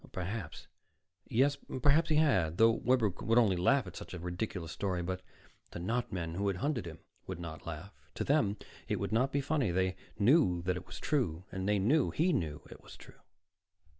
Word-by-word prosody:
Perhaps 95 -1 -5 0.6
yes, 140 +5 +2 0.3
perhaps 155 +4 +4
he 155 - +3
had, 95 - +3
though 115 +1 +6
Webber 115 -1 +2
would 115 +5 0
only 110 -6 +5
laugh 120 +8 +3
at 90 - -9
such - - -8
a - - -6
ridiculous 90 -1 -4
story. 90 -2 -2
But 95 +1 -3 0.5
the - - -7
not 115 +8 -1
men 85 -3 -3
who 100 +4 -1
had 95 -2 0
hunted 130 - -1
him 80 0 -8 0.3
would - - -5
not 80 -1 -8
laugh; 85 +5 -7 0.2
to - - -2
them, 135 -8 +2 0.3
it - - -1
would - - -3
not 125 +5 +2
be 140 - +1
funny. 140 -5 0
They 95 +1 +1 0.2
knew 105 - +4
that 90 0 0
it 90 - -7
was 90 - -8
true. 95 - 0
And 95 +1 -2
they 105 - +3
knew 125 +11 +3
he 175 +3 +1
knew 75 - -2
it - - -11
was - - -13
true. - - -15
100 Hz, 200 wpm, -32 LUFS, 90-130 Hz, 0.6 s, though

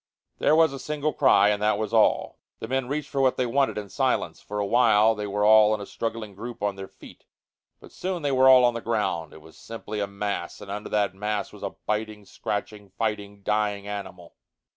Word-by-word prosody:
There 150 - +4
was 160 -3 +4
a 135 - -6
single 150 +1 -2
cry, 100 -4 +4
and 105 0 0
that 105 -1 +2
was 110 0 -4
all. - - +2 0.2
The - - -6
men 130 0 -1
reached 145 +1 -3
for 135 - 0
what 130 -1 +2
they 130 - +1
wanted 135 +2 +1
in 105 -1 -4
silence. - - -1
For 105 - -7
a 105 - 0
while 110 0 +4
they 105 -1 -5
were 105 +1 0
all 110 0 +6
in - - -7
a 100 - -6
struggling 115 -1 -5
group 115 +2 -8
on 100 -1 0
their 95 0 -8
feet, - - -16 0.5
but - - -15
soon 180 -3 -4
they 145 - 0
were 130 0 +5
all 130 -1 +8
on 120 - +3
the 115 - -5
ground. 95 -9 -2
It 80 - -14
was 80 +1 -16
simply 110 -2 -7
a 100 - -1
mass, 100 -3 -4
and 100 - -9
under 105 +1 -5
that 105 -2 0
mass 105 +1 -3
was - - -13
a - - -5
biting, 105 -1 -3
scratching, 105 0 -5
fighting, 100 -1 -4
dying 105 -1 -1
animal. 100 -4 -7
105 Hz, 225 wpm, -25 LUFS, 100-120 Hz, 0.5 s, all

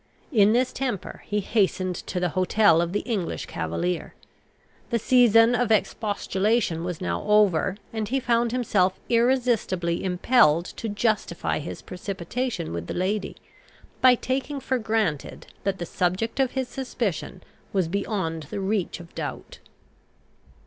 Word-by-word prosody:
In 210 -5 +5
this 250 +2 +1
temper 245 -8 -4
he 210 0 0
hastened 190 -3 +1
to 180 - -2
the 180 0 0
hotel 185 -1 +4
of 170 0 -1
the 205 - 0
English 205 -8 -3
cavalier. 125 - -3 0.7
The 235 - +1
season 230 -1 +5
of 245 -2 +1
expostulation 205 -3 0
was 175 -2 -4
now 85 -1 -2
over, 200 -3 +3 0.2
and 220 -2 -2
he 270 +2 +1
found 235 -2 +1
himself 200 -7 +1
irresistibly 230 -8 +1
impelled 180 -3 +3
to 225 - -6
justify 205 -4 -1
his 155 - -7
precipitation 195 - -4
with 85 0 -4
the - - -4
lady, 195 +3 -1 0.7
by 255 -1 +7
taking 270 +3 -2
for 260 -1 -1
granted 215 -9 -1 0.2
that 195 -1 0
the 175 - -4
subject 185 +9 -1
of 265 -2 +2
his 265 -1 -1
suspicion 230 - -4 0.3
was 190 -4 +1
beyond 165 -5 -2
the - - -4
reach 195 -2 -1
of 170 -1 -13
doubt. - - -6
205 Hz, 140 wpm, -25 LUFS, 180-235 Hz, 0.7 s, by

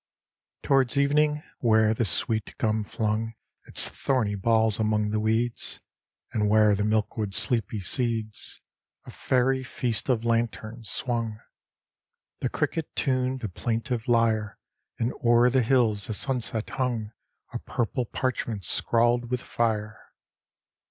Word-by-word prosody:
XXIX - - -58
Towards 135 -1 +3
evening, 150 +2 +2 0.2
where 110 -2 +4
the 115 +1 0
sweet 110 +2 -1
gum 110 -1 0
flung 110 +1 -2 0.3
Its - - +2
thorny 125 -7 0
balls 110 +1 +2
among 105 -1 +1
the 110 - 0
weeds, 115 +2 -1 0.5
And 105 -2 +1
where 105 0 +5
the 100 +1 0
milkweed's 105 -1 0
sleepy 110 -3 0
seeds, 110 +2 -2 0.4
A - - -9
fairy 130 +1 +1
Feast 125 -2 -2
of 120 -3 +1
Lanterns, 115 -1 -2
swung; 115 -3 -2 1.0
The - - -1
cricket 160 -2 -2
tuned 130 -2 0
a - - 0
plaintive 115 +5 -3
lyre, 110 -3 +2 0.4
And 115 +2 -1
o'er 120 +1 +5
the 130 0 +3
hills 115 -4 +2
the 110 - -2
sunset 120 -3 -1
hung 120 -5 -2 0.4
A - - -3
purple 120 +1 -2
parchment 115 - -2
scrawled 120 +1 +2
with 125 0 -2
fire. 110 -2 -1
115 Hz, 130 wpm, -26 LUFS, 110-125 Hz, 1.0 s, where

